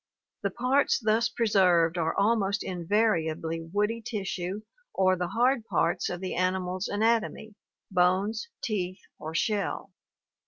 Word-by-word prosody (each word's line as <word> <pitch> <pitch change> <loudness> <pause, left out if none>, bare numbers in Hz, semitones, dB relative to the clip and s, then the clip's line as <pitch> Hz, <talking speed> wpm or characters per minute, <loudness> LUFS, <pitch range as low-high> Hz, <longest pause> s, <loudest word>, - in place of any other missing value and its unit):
The - - 0
parts 255 +4 +2
thus 220 0 +2
preserved 180 -7 +3
are 165 -2 0
almost 205 -1 +2
invariably 165 -4 0
woody 210 +7 -1
tissue 195 -3 -4 0.3
or 185 -1 +3
the 180 -1 -2
hard 240 +4 +2
parts 165 +1 0
of 175 0 -5
the 185 - -3
animal's 185 +1 -1
anatomy 220 0 0 0.2
— - - -65
bones, 190 +4 +1 0.2
teeth, 185 -4 -2 0.2
or 160 +1 -6
shell. 200 +3 -1
195 Hz, 125 wpm, -28 LUFS, 180-220 Hz, 0.3 s, preserved